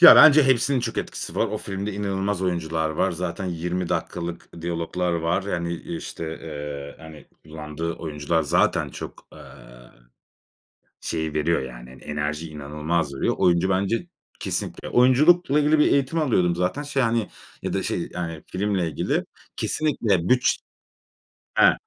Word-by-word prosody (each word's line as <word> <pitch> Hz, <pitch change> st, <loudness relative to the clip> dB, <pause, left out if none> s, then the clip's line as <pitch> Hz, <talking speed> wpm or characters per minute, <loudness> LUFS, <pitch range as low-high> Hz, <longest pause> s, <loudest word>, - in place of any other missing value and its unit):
Ya, 175 Hz, -, +11 dB
bence 155 Hz, 0 st, +9 dB
hepsinin 130 Hz, +1 st, +3 dB
çok -, -, -2 dB
etkisi -, -, -4 dB
var. -, -, +2 dB
O -, -, -3 dB
filmde 100 Hz, +2 st, -4 dB
inanılmaz 100 Hz, -1 st, -1 dB
oyuncular 80 Hz, -3 st, 0 dB
var. 85 Hz, +5 st, +1 dB
Zaten 90 Hz, +3 st, -3 dB
20 90 Hz, +1 st, -2 dB
dakikalık 85 Hz, -1 st, -3 dB
diyaloglar 85 Hz, +1 st, -1 dB
var. 85 Hz, +2 st, 0 dB
Yani 85 Hz, -3 st, -2 dB
işte, 165 Hz, -, -6 dB, 0.2 s
eee, 75 Hz, -2 st, -6 dB
hani, 80 Hz, -2 st, -11 dB, 0.2 s
kullandığı 80 Hz, +1 st, -5 dB
oyuncular 80 Hz, +1 st, -1 dB
zaten 75 Hz, -, +2 dB
çok, -, -, -9 dB
eee, -, -, -13 dB, 1.6 s
şeyi 80 Hz, -2 st, -3 dB
veriyor 75 Hz, +1 st, +1 dB
yani, 60 Hz, -1 st, -9 dB
hani, 65 Hz, -, -14 dB
enerjiyi 75 Hz, +2 st, -3 dB
inanılmaz 75 Hz, +1 st, -2 dB
veriyor. 65 Hz, -, 0 dB
Oyuncu 85 Hz, +1 st, +3 dB
bence 100 Hz, -, 0 dB, 0.3 s
kesinlikle. -, -, -3 dB
Oyunculukla 145 Hz, +5 st, +5 dB
ilgili 150 Hz, +1 st, +3 dB
bir 150 Hz, -, +4 dB
eğitim 140 Hz, +4 st, +2 dB
alıyordum 90 Hz, -, +2 dB
zaten 90 Hz, +11 st, 0 dB
şey 145 Hz, -2 st, 0 dB
hani, 115 Hz, -3 st, +1 dB, 0.3 s
ya -, -, -2 dB
da -, -, 0 dB
şey -, -, -2 dB
yani 80 Hz, -3 st, -4 dB
filmle 95 Hz, -2 st, 0 dB
ilgili. 75 Hz, -, -1 dB, 0.3 s
Kesinlikle 110 Hz, -, +1 dB
bütç 125 Hz, -1 st, +3 dB, 1.0 s
He. -, -, +7 dB
85 Hz, 145 wpm, -24 LUFS, 80-115 Hz, 1.6 s, Ya